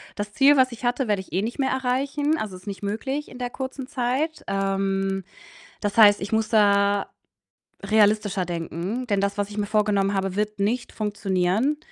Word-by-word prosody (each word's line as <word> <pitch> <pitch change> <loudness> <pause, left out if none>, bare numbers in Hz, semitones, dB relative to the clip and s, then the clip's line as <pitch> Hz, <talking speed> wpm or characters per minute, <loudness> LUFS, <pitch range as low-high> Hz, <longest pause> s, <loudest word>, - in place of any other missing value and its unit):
Das 205 0 -4
Ziel, 280 +1 +5
was 255 -1 +4
ich 235 +1 -7
hatte, 245 0 0
werde 205 -2 +1
ich 185 - -15
eh 190 - +1
nicht 230 +6 -4
mehr 270 -1 0
erreichen. 275 +4 0
Also, 205 -4 -4
ist 185 +3 -14
nicht 200 0 -6
möglich 265 +8 -3
in 250 - -11
der 245 -1 -2
kurzen 265 0 -6
Zeit. 275 +4 -2
Ähm, 195 0 -1 0.6
das 205 +1 -2
heißt, 205 -3 +7
ich 195 - -5
muss 220 0 +1
da 200 -2 +3 0.8
realistischer 210 -2 +2
denken, 175 +8 -4
denn 200 -2 +1
das, 200 +1 -1
was 205 0 -1
ich 210 - -7
mir 205 - 0
vorgenommen 205 -2 +1
habe, 195 -1 -1
wird 210 -1 -2
nicht 235 +5 -1
funktionieren. 210 +5 0
210 Hz, 185 wpm, -24 LUFS, 195-250 Hz, 0.8 s, heißt